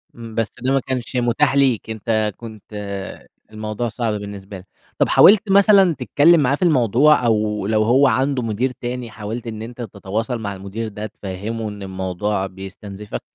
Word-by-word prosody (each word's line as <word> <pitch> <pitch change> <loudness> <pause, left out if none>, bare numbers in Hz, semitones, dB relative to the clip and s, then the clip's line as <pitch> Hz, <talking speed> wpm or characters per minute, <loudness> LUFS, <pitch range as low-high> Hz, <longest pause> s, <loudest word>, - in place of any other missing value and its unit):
إمم، 115 -2 -10
بس 115 -1 -1
ده 130 +1 0
ما 135 - +3
كانش 130 -1 -4
متاح 130 +4 +2
ليك، 130 -6 +2
أنت 110 -1 -1
كنت 110 -4 -10 0.9
الموضوع 110 +2 -4
صعب 115 -1 -2
بالنسبة 100 -1 -7
لك. 95 +1 -14 0.3
طَب - - +2
حاولت 205 0 +6
مثلًا 195 -3 +6
تتكلّم 165 +3 +4
معاه 140 0 +2
في - - -15
الموضوع 140 - +4
أو 105 -3 0
لو 110 0 +2
هو 130 +5 +4
عنده 130 -1 +1
مدير 115 +4 -1
تاني، 125 -2 -6
حاولت 110 +3 -6
إن 110 -1 -6
أنت 120 +2 -8
تتواصل 110 +3 -4
مع 100 -2 -4
المدير 100 +4 -6
ده 105 0 -6
تفهّمه 105 +2 -5
إن 105 -1 -8
الموضوع 95 +1 -2
بيستنزِفك؟ 95 +2 -8
110 Hz, 165 wpm, -20 LUFS, 105-125 Hz, 0.9 s, حاولت